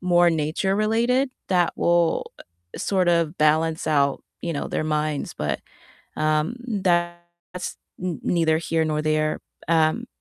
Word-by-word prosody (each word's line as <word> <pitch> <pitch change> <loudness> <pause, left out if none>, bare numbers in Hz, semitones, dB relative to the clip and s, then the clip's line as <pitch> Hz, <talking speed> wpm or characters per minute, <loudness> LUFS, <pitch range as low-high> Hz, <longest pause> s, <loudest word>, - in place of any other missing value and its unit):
more 175 -1 +4
nature 160 +5 0
related 235 +5 +2 0.2
that 180 -2 +3
will 170 -1 +1 0.4
sort 185 -3 +1
of 170 0 +1
balance 160 +1 +2
out, 140 -3 +2 0.2
you 170 - -2
know, 145 - -3
their - - -1
minds, 150 -1 -1
but, 75 -3 -2 0.6
um, 155 +6 +1
that's 175 -3 -2 0.3
n 180 -3 -3
neither 160 -2 +2
here 165 -1 0
nor 155 -1 -1
there, 155 0 0 0.3
um, 165 +8 +2
165 Hz, 130 wpm, -24 LUFS, 155-180 Hz, 0.6 s, more